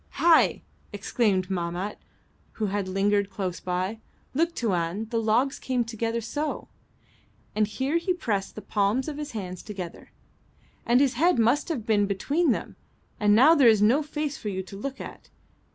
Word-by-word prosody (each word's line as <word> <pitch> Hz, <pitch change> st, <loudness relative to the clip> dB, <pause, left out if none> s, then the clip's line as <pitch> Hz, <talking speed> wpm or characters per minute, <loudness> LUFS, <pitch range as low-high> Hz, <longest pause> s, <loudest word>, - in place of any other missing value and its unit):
"Hai!" 335 Hz, -1 st, +4 dB, 0.3 s
exclaimed 200 Hz, -2 st, 0 dB
Mahmat, 175 Hz, +3 st, -3 dB, 0.5 s
who 220 Hz, -, -2 dB
had 200 Hz, -1 st, -2 dB
lingered 200 Hz, +1 st, +1 dB
close 185 Hz, -3 st, -4 dB
by. 185 Hz, +4 st, -2 dB, 0.3 s
"Look, 330 Hz, +4 st, +1 dB
Tuan; 190 Hz, -2 st, -1 dB
the 230 Hz, -1 st, +1 dB
logs 235 Hz, +5 st, +1 dB
came 255 Hz, -2 st, 0 dB
together 230 Hz, 0 st, -2 dB
so," 290 Hz, +7 st, -4 dB, 0.8 s
and 215 Hz, 0 st, +2 dB
here 265 Hz, +8 st, -1 dB
he 340 Hz, +3 st, -1 dB
pressed 220 Hz, -, -2 dB
the 215 Hz, -, -8 dB
palms 210 Hz, +6 st, 0 dB
of 300 Hz, -2 st, -4 dB
his 295 Hz, -3 st, -6 dB
hands 185 Hz, -4 st, -5 dB
together, 185 Hz, -5 st, -8 dB, 0.8 s
"and 245 Hz, +3 st, +5 dB
his 275 Hz, -3 st, +3 dB
head 335 Hz, +8 st, +3 dB
must 235 Hz, +8 st, +2 dB
have 260 Hz, -10 st, -3 dB
been 205 Hz, -3 st, +2 dB
between 285 Hz, -, 0 dB
them, 240 Hz, -, -2 dB, 0.4 s
and 210 Hz, -1 st, +4 dB
now 270 Hz, +8 st, +7 dB
there 275 Hz, -7 st, +6 dB
is 215 Hz, -2 st, +4 dB
no 245 Hz, +8 st, +4 dB
face 300 Hz, -1 st, -3 dB
for 210 Hz, -, -4 dB
you 190 Hz, -1 st, -3 dB
to 195 Hz, -, -11 dB
look 275 Hz, +7 st, -5 dB
at. -, -, -9 dB
220 Hz, 170 wpm, -26 LUFS, 200-275 Hz, 0.8 s, now